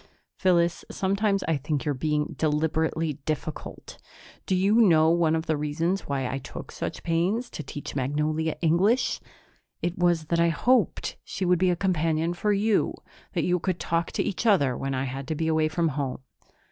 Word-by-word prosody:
"Phyllis, 175 -2 +2
sometimes 195 +1 0
I 165 -2 0
think 145 +1 -2
you're 145 - +1
being 150 +2 -1
deliberately 160 0 0
difficult. 155 0 -5 0.5
Do 190 - +2
you 200 +5 +4
know 160 -6 +5
one 165 -2 +3
of 160 0 -2
the 160 - +1
reasons 160 +6 -1
why 135 -2 -1
I 135 +2 -3
took - - -9
such - - -5
pains 185 +9 0
to - - -5
teach 145 -1 -7
Magnolia 150 +4 0
English? 190 +10 +2 0.6
It 175 +1 -2
was 175 -2 +2
that 170 - +3
I 170 0 +4
hoped 240 +6 +1
she 190 - -4
would 180 -1 +3
be 185 0 +3
a 175 - +2
companion 165 -2 0
for 210 +4 0
you, 205 +1 +2 0.4
that - - 0
you 180 0 +2
could 180 0 -2
talk 165 0 -1
to - - 0
each 205 +4 -2
other 145 - +4
when 135 +1 -3
I 130 - -1
had 135 +1 -5
to 160 - -2
be 160 +1 -1
away 155 -1 +2
from 165 +1 0
home." 135 -3 -3
165 Hz, 185 wpm, -26 LUFS, 150-180 Hz, 0.6 s, know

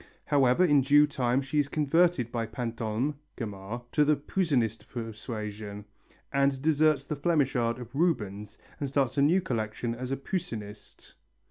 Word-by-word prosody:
However, 140 +3 +4
in 145 -4 +5
due 145 +3 +6
time 130 -3 0
she 135 +3 -1
is 145 - +2
converted 150 -3 +2
by 115 -1 -2
Pantolme 115 +4 -3 0.2
(Gamarre) 105 +1 -6
to 150 - +4
the 150 +1 +4
Poussinist 140 - -1
persuasion 105 -3 -6 0.5
and 140 -1 +2
deserts 155 -1 +2
the 150 - -3
Flemish 145 -2 +1
art 115 -1 +1
of 120 -1 -10
Rubens 105 - -1 0.2
and 140 - -2
starts 135 0 +1
a - - +4
new 170 +7 +4
collection 115 -5 -2
as 125 +2 -5
a 135 - 0
Poussinist. 115 - -6
130 Hz, 150 wpm, -28 LUFS, 115-150 Hz, 0.5 s, due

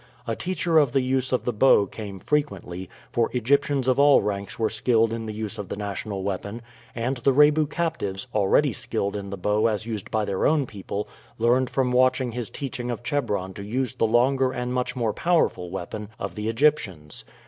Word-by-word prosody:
A 115 - -2
teacher 175 -1 +1
of 140 -5 +2
the 135 - +3
use 130 0 0
of 125 - 0
the 125 - 0
bow 105 -2 +5
came 100 0 -8
frequently 95 - -2 0.2
for 115 -1 +1
Egyptians 135 +2 +1
of 130 +1 +3
all 145 0 +7
ranks 100 -1 -3
were 110 - +1
skilled 115 0 +2
in 115 -1 -4
the - - -3
use 110 0 -4
of 100 -2 -6
the - - -3
national 100 -1 -4
weapon 100 +4 -4 0.3
and 120 +3 -1
the 130 +3 +2
Rebu 150 +2 +5
captives, 135 - -2
already 110 +7 +3
skilled 110 -5 -3
in 100 -1 -5
the 100 - -5
bow 105 +4 +2
as 110 -1 -1
used 110 -4 -5
by 110 -1 0
their 95 -2 +1
own 150 -3 +2
people, 100 -2 -5 0.3
learned 120 +2 +2
from 130 -2 0
watching 130 0 +3
his 120 -1 -4
teaching 125 -4 -5
of 120 0 -4
Chebron 105 -10 -1
to 100 - -8
use 125 +3 -2
the 120 -3 +1
longer 130 +3 +3
and 125 -1 -3
much 125 +1 -1
more 115 -4 0
powerful 165 - +1
weapon 95 +3 -6
of - - -5
the 105 +1 -3
Egyptians. 115 - 0
115 Hz, 200 wpm, -25 LUFS, 105-130 Hz, 0.3 s, all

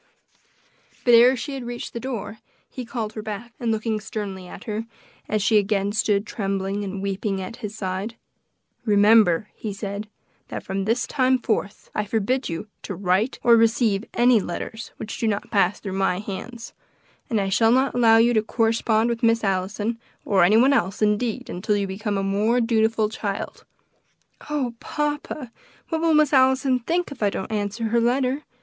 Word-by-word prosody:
But 240 - +5
ere 245 +3 +7
she 280 +4 -5
had 270 -2 -5
reached 240 0 -6
the 235 - -4
door 230 -4 -5 0.3
he 255 - -7
called 225 -3 -4
her 215 - -5
back, 220 +3 -7
and 235 -2 0
looking 220 0 -1
sternly 200 -3 -6
at 180 - -10
her, 220 +1 -4 0.4
as 215 -2 0
she 215 +1 +5
again 200 0 0
stood 210 -1 +1
trembling 195 -1 -2
and 195 0 -5
weeping 195 0 -2
at 190 +5 -6
his 210 -3 -6
side, 195 +3 -3 0.7
"Remember," 210 -3 +4
he 215 - -5
said, 200 +1 -5 0.4
"that - - -6
from 195 0 -3
this 230 +4 +1
time 260 -1 +2
forth, 215 -4 -3
I 210 - -1
forbid 225 +5 -1
you 165 +5 -5
to 195 - -6
write 190 +6 +1
or 235 -1 +7
receive 225 -2 +2
any 240 -1 +5
letters 220 +4 -6
which 215 - -6
do 230 - 0
not 205 -1 -2
pass 200 -2 +2
through 195 -3 -6
my 190 -2 +1
hands, 215 +4 -7 0.6
and 225 - +1
I 195 -1 0
shall 225 +3 +3
not 260 +2 +3
allow 230 -2 +5
you 235 +2 +4
to 215 - +3
correspond 225 0 +1
with 235 0 -2
Miss 230 -1 +3
Allison, 205 +4 -1 0.3
or 190 -3 +3
any 205 +5 +5
one 265 +4 +5
else, 200 -3 0
indeed, 225 +4 0
until 205 +4 -1
you 200 - 0
become 205 +2 -3
a 195 - -1
more 210 +5 +1
dutiful 225 -2 +2
child." 210 -1 -5 0.8
"Oh, 275 -5 -1
papa! 295 -3 -3 0.4
what 320 -1 -1
will 330 -1 +3
Miss 300 -1 +4
Allison 260 -1 +4
think 335 +7 -1
if 280 - -10
I 205 - +3
don't 195 +2 -5
answer 205 +1 -2
her 235 +1 +2
letter?" 255 +3 +1
220 Hz, 180 wpm, -23 LUFS, 200-240 Hz, 0.8 s, ere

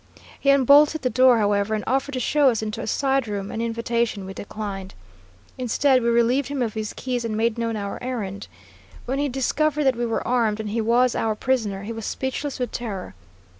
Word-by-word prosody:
He 280 - +1
unbolted 285 +3 +5
the 255 - +1
door, 255 -1 +5
however, 205 0 +1
and 210 - -3
offered 270 +3 0
to 255 - -1
show 280 +2 +3
us 225 -3 -1
into 215 +1 -4
a - - -5
side 270 -3 +1
room, 200 -1 -4
an 225 - -3
invitation 230 -2 -1
we 190 - -7
declined. 195 -2 -6 0.6
Instead, 255 +2 +2
we 235 - +1
relieved 235 +4 +2
him 280 -3 -2
of 225 -3 -3
his 215 -1 -4
keys 250 -2 -3
and 220 -2 -2
made 230 +1 0
known 230 -1 -1
our 200 -1 -5
errand. 205 -6 -4 0.6
When 265 +3 -2
he 285 0 0
discovered 295 +3 0
that 265 -2 +3
we 240 0 -1
were 230 - -2
armed 230 -4 +1
and 215 -1 -4
he 225 +2 -1
was 240 +3 +3
our 220 -1 0
prisoner, 215 -6 -1
he 225 +3 -5
was 225 -2 -6
speechless 265 +2 -3
with 250 -1 -3
terror. 205 -6 -5
235 Hz, 205 wpm, -23 LUFS, 215-260 Hz, 0.6 s, unbolted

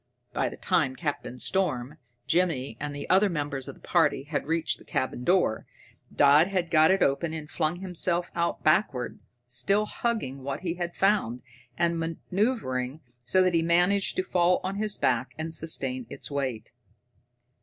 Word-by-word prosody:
By - - 0
the - - -10
time 130 - +1
Captain 145 -4 -4
Storm, 150 -4 -1 0.3
Jimmy, 150 -9 0
and 145 0 -4
the 145 - -6
other 195 +2 +4
members 145 -5 -3
of - - -7
the - - -17
party 135 - +2
had 145 -1 -3
reached 165 0 0
the - - -15
cabin 130 -1 -2
door, 175 -9 +2 0.4
Dodd 145 +4 +5
had 180 -4 -2
got 155 -1 +6
it 190 0 +4
open 155 +4 0
and 155 -2 -5
flung 170 +4 -1
himself 180 -1 0
out 170 0 -1
backward, 155 - +1 0.3
still 195 +13 +1
hugging 210 - -2
what 140 +2 -4
he 175 -3 -2
had 175 -1 -4
found, 195 - +1 0.3
and 170 -1 +1
maneuvering 165 - -2 0.2
so 185 +10 +3
that 185 -1 +2
he 165 - +3
managed 180 +4 +2
to 185 - 0
fall 180 -1 +2
on 195 +2 -3
his 210 0 0
back 125 0 0
and 160 +1 -4
sustain 135 -7 -3
its - - -7
weight. 130 -6 -3
165 Hz, 165 wpm, -27 LUFS, 135-180 Hz, 0.4 s, got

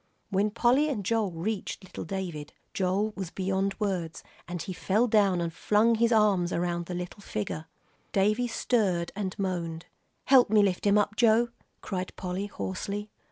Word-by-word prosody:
When 200 +2 +2
Polly 250 +7 +3
and 210 -9 -3
Joel 225 -1 +1
reached 190 +5 -4
little 185 - -7
David, 170 -5 -5 0.2
Joel 195 +3 0
was 190 -3 -4
beyond 195 +2 -1
words, 180 -6 -2 0.2
and 175 0 -4
he 185 - -5
fell 205 +6 +1
down 205 -6 +3
and 170 -1 -2
flung 215 +6 +3
his 230 +1 +2
arms 205 -6 +3
around 175 0 -1
the 180 - -4
little 180 +3 -6
figure. 155 - -4 0.4
Davie 215 +5 +2
stirred 200 -8 0
and 195 -2 -3
moaned. 175 -4 -3 0.4
"Help 260 -4 +6
me 210 -1 +5
lift 195 0 0
him 200 +1 +5
up, 210 0 +1
Joe," 235 0 +4 0.3
cried 185 -2 -4
Polly, 185 +2 -3
hoarsely. 205 +1 -4
195 Hz, 160 wpm, -28 LUFS, 180-215 Hz, 0.4 s, Help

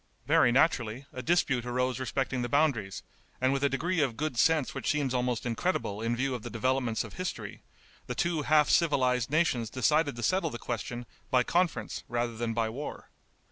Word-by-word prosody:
Very 120 - +4
naturally, 125 -3 +2
a 130 - -5
dispute 135 -5 +1
arose 125 +1 -1
respecting 130 0 -1
the 120 - -2
boundaries, 140 -10 +1 0.4
and 130 +1 +2
with 140 0 -1
a 140 - +4
degree 165 +6 -1
of 130 -6 0
good 155 -3 -2
sense 155 +4 +2
which - - -3
seems 145 -4 0
almost 125 -2 -1
incredible 115 - -1
in 115 +1 0
view 135 +2 -1
of 125 - -4
the - - -6
developments 125 -1 0
of - - -10
history, 185 +1 -5 0.5
the - - -3
two 170 -3 0
half 150 0 +4
civilized 130 -7 +2
nations 135 -7 +1
decided 145 +3 +2
to 120 - -6
settle 175 - +1
the 120 - -6
question 120 +1 -5 0.2
by 125 -1 +4
conference 175 +3 -1
rather 120 0 -1
than 115 0 -2
by 115 -1 +1
war. 135 +7 -7
130 Hz, 185 wpm, -29 LUFS, 120-150 Hz, 0.5 s, Very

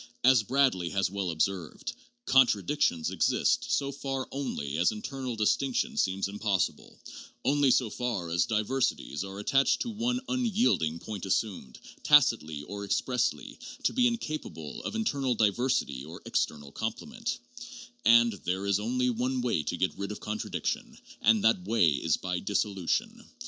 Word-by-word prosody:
As 130 -2 +6
Bradley 120 -7 +1
has 95 0 0
well 100 -2 -2
observed, 85 +1 -2
' - - -33
' 120 - -54
Contradictions 125 - +3
exist - - +1
so 140 -1 +1
far 135 -1 -4
only 80 - -3
as 90 - +4
internal 125 +3 -5
dis 105 -1 +3
tinction 135 -3 -2
seems 95 +1 0
impossible, 100 -2 -2 0.5
only 145 0 +3
so 125 -1 +3
far 105 -9 -3
as 85 0 +2
diversities 110 - -1
are 95 0 -8
attached 135 +7 +2
to 235 - -4
one 240 +3 -1
unyielding 230 - +1
point 100 +1 -6
assumed, 95 - -2 0.2
tacitly 115 - +4
or 100 +6 -6
expressly, 125 +4 -1 0.2
to - - +1
be 250 -1 +4
in 235 -1 0
capable 150 - -6
of - - -3
internal 140 - 0
diversity 110 - +1
or 80 +4 -10
external 75 -2 -2
complement"; 225 - -4 0.7
and, 115 0 +6
"There 95 +2 -2
is 100 0 +2
only 125 +3 0
one 125 +2 -1
way 120 -10 +1
to 90 - -3
get 95 - 0
rid 100 +1 -3
of 105 - -6
contradiction, 110 0 -3 0.2
and 110 -1 +4
that 110 -5 +3
way 105 -8 +4
is 80 +3 +1
by 90 -1 -3
dissolution. 100 -2 -1
110 Hz, 155 wpm, -29 LUFS, 95-135 Hz, 0.7 s, As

